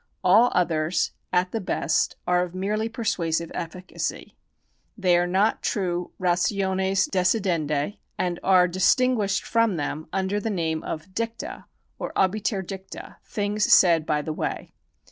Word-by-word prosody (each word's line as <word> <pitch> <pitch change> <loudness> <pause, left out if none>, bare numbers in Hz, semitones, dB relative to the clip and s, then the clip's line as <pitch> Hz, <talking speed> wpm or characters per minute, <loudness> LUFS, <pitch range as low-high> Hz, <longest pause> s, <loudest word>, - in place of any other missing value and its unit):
All 210 +7 +5
others, 165 -1 +1 0.2
at 180 +1 +1
the 225 - -2
best, 185 - 0
are 180 0 +2
of 180 0 -4
merely 210 +4 -1
persuasive 170 -8 -1
efficacy. 180 +2 -5 0.6
They 185 -4 +3
are 175 0 +2
not 195 +5 +2
true 180 -3 -1
rationes 190 +1 +1
decidendi, 180 -4 0 0.2
and 175 -1 -1
are 185 -2 +5
distinguished 200 +3 +2
from 230 -4 +2
them 155 0 -4
under 195 +1 -1
the 225 - -3
name 165 -5 -1
of 165 +4 -6
dicta 230 +2 -4 0.3
or - - -5
obiter 195 +1 +1
dicta, 190 +1 -9
things 205 0 -1
said 165 -4 +6
by 150 -1 0
the 155 - -3
way. - - -4
185 Hz, 135 wpm, -25 LUFS, 175-205 Hz, 0.6 s, said